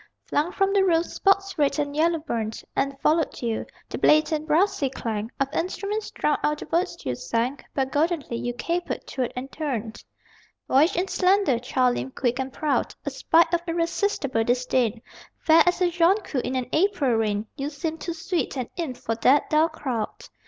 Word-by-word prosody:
Flung 305 +5 0
from 390 +1 +1
the 395 -1 +4
roof, 340 -3 +3
spots 390 -2 +1
red 285 0 +2
and 290 -1 -2
yellow 330 +2 +3
burned 230 -8 -4
And 275 0 -1
followed 320 +1 +1
you. 230 -2 -2 0.2
The - - -5
blatant 310 0 +3
brassy 335 -2 +2
clang 225 -4 -4
Of 275 0 -1
instruments 400 +5 -2
drowned 300 - 0
out 300 0 +1
the - - -7
words 350 +3 -1
you 130 - 0
sang, 230 - -2 0.2
But 265 -1 0
goldenly 300 -5 0
you 245 0 -3
capered, 345 +7 -3
twirled 255 -3 -3
and 260 +2 -6
turned. 235 -8 -4 0.6
Boyish 300 +8 +4
and 360 +2 0
slender, 375 - +2
child 250 0 +1
limbed, 265 - -5
quick 245 0 0
and 265 0 -2
proud, 285 -4 -1
A 285 - -2
sprite 330 +5 +3
of 345 - +2
irresistible 335 - 0
disdain, 245 -1 0 0.3
Fair 320 0 +5
as 355 +1 +2
a 355 -1 +3
jonquil 345 -4 +2
in 255 - -3
an 255 -1 -1
April 320 -6 +2
rain, 215 -2 0
You 280 0 -3
seemed 315 +2 -4
too 340 - -4
sweet 335 -3 -2
an 250 -2 -4
imp 315 -8 -3
for 225 - -2
that 270 +5 +3
dull 310 +2 +4
crowd.... 260 -8 -4
295 Hz, 180 wpm, -25 LUFS, 250-340 Hz, 0.6 s, Fair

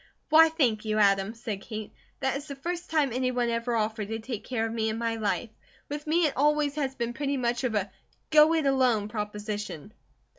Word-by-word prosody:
"Why, 320 +1 +7
thank 255 -10 +1
you, 215 -1 -1
Adam!" 200 +1 +3
said 220 -4 -5
Kate. 215 -1 -7 0.3
"That 265 0 +1
is 285 +2 -5
the 280 - -6
first 345 +5 -5
time 295 -6 +1
any 255 +1 0
one 245 -1 0
ever 230 +1 -1
offered 215 -1 -1
to 225 +1 -3
take 225 -1 -6
care 235 -3 -1
of 225 - -3
me 220 -1 0
in 220 - -2
my 230 0 -1
life. 215 +1 -1 0.4
With 295 +1 -5
me 330 +2 +3
it 295 - +1
always 295 0 +2
has 275 -3 -2
been 240 -2 -2
pretty 280 +1 -1
much 240 0 -1
of 240 -4 0
a 200 -1 -1 0.4
'go 305 0 +7
it 315 -3 +1
alone' 250 -6 +2
proposition." 210 -3 -5
240 Hz, 215 wpm, -28 LUFS, 215-280 Hz, 0.4 s, Why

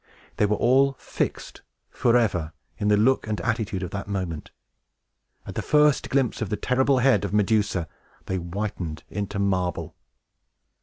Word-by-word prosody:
They 105 - +3
were 105 - +1
all 135 +5 +3
fixed, - - -4 0.3
forever, 110 -10 +1 0.3
in 105 - 0
the 105 0 +4
look 125 +3 +2
and 105 -2 -2
attitude 105 -2 -2
of 90 - -5
that 100 0 -5
moment! 90 -6 -4 1.0
At - - -7
the - - -2
first 150 -1 +3
glimpse 135 -4 0
of 110 - -2
the 105 - -1
terrible 130 +1 +2
head 130 -3 +3
of 100 +1 -2
Medusa, 105 -4 +1 0.4
they 95 - -2
whitened 85 -3 -4
into 100 0 -3
marble! 95 -4 -1
105 Hz, 150 wpm, -25 LUFS, 95-120 Hz, 1.0 s, the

